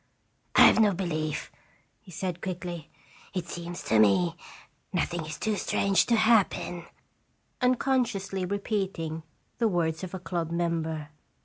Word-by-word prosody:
"I - - +7
have - - +8
no 210 -3 +4
belief," 155 -4 -2 0.5
he 195 - -19
said, 180 0 -4
quickly. 175 -3 -5 0.5
"It 180 -2 -2
seems 175 0 -6
to 110 - +3
me 110 - +4 0.6
nothing 175 -2 -1
is 155 - -5
too 215 -1 0
strange 195 0 +2
to 235 - +4
happen," 215 -6 +2 0.7
unconsciously 245 -7 +1
repeating 190 -5 -2 0.4
the 230 - +3
words 170 -4 0
of 185 0 -5
a - - -5
club 170 -2 -3
member. 165 -3 -2
175 Hz, 130 wpm, -28 LUFS, 165-195 Hz, 0.7 s, have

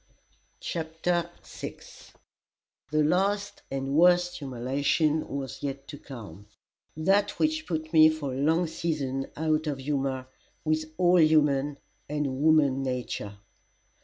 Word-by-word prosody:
CHAPTER 170 +1 -2
VI - - -8 1.1
The 155 +1 +2
last 200 +5 0
and 135 0 -3
worst 175 +2 +4
humiliation 140 +4 0
was 135 -1 -5
yet 140 -1 -5
to 145 - -8
come 105 - -10 0.5
that 195 +6 +2
which 315 0 0
put 155 -1 -3
me 155 -1 +8
for 150 -4 -3
a - - -4
long 160 +4 +3
season 145 -5 -2
out 155 0 0
of 145 -2 -1
humour 135 -1 -2 0.4
with 155 0 +1
all 180 0 +5
human 145 -2 +3 0.3
and 145 -3 -2
woman 150 -4 +4
nature. 125 -6 -4
155 Hz, 120 wpm, -27 LUFS, 135-165 Hz, 1.1 s, me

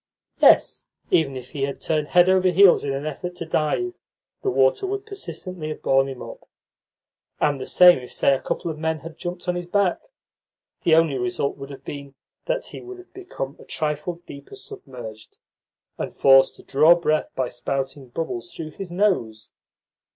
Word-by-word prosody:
Yes, - - +4 0.2
even 140 -5 +2
if 125 -1 -10
he 140 - -6
had 140 0 -2
turned 155 -2 -1
head 175 +2 +5
over 185 0 +4
heels 185 +1 +6
in 140 - -2
an 135 +2 -3
effort 175 +4 -5
to 170 - -5
dive, 165 - -1 0.5
the 400 - 0
water 410 0 +2
would 400 +1 -4
persistently 185 - -6
have 155 - -7
borne 135 0 +3
him 130 -2 -7
up; - - -11 0.9
and 145 -3 +1
the - - -5
same 180 -4 +7
if, 125 - -11
say, 140 - +2
a 135 - -1
couple 170 - -3
of 155 - -9
men 160 -1 -2
had 165 +1 -9
jumped 175 0 -6
on 180 - +1
his 175 0 -5
back 195 -1 +1 0.8
the 165 -3 +4
only 160 -4 +3
result 180 -6 -1
would 135 0 -9
have 140 - -10
been 140 -1 -8 0.3
that - - -1
he - - -9
would 375 0 -9
have 365 0 -16
become 335 - -6
a - - -13
trifle 160 +3 -3
deeper 140 0 -11
submerged, 110 -5 -11 0.6
and - - -4
forced 135 -1 +5
to - - -16
draw 155 +5 +5
breath 155 -3 0
by 130 -1 -1
spouting 135 +2 -4
bubbles 120 -4 -5
through 155 -1 -6
his 190 +3 -8
nose. 175 - 0
155 Hz, 185 wpm, -23 LUFS, 135-180 Hz, 0.9 s, same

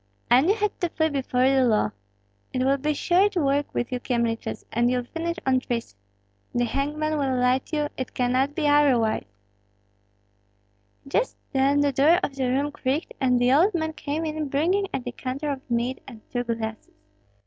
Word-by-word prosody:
"And 260 +8 +5
you 410 - +4
had 420 -2 -2
to 350 - +1
flee 315 -1 0
before 260 -3 +1
the 265 -1 +4
law. 215 - +2 0.6
It 255 - 0
will 275 +1 +3
be 300 +3 0
short 380 +6 +2
work 285 -3 +1
with 240 - -2
you 250 - -2
Kyemliches, 235 -3 -2
and 240 +1 +2
you'll 250 0 0
finish 335 +6 -4
on 260 -1 +3
trees. 235 - -4 0.6
The 240 0 +2
hangman 300 +4 -1
will 265 -2 0
light 250 +1 +1
you, 300 -2 0
it 260 - -5
cannot 255 +3 +1
be 305 -3 0
otherwise!" 265 - +3 1.8
Just - - 0 0.2
then 275 +2 +3
the 285 -1 +2
door 295 +6 +4
of 275 - -2
the 265 -2 -1
room 280 +3 0
creaked, 285 +2 -2
and 250 -2 +3
the 245 +1 +3
old 355 +8 +4
man 315 -1 -1
came 310 +1 -3
in 310 -1 -3
bringing 360 +9 +1
a - - -1
decanter 255 +4 -4
of 270 -1 -4
mead 240 +2 -1
and 235 -5 -11
two 245 0 -2
glasses. 225 -2 -4
270 Hz, 180 wpm, -25 LUFS, 250-305 Hz, 1.8 s, And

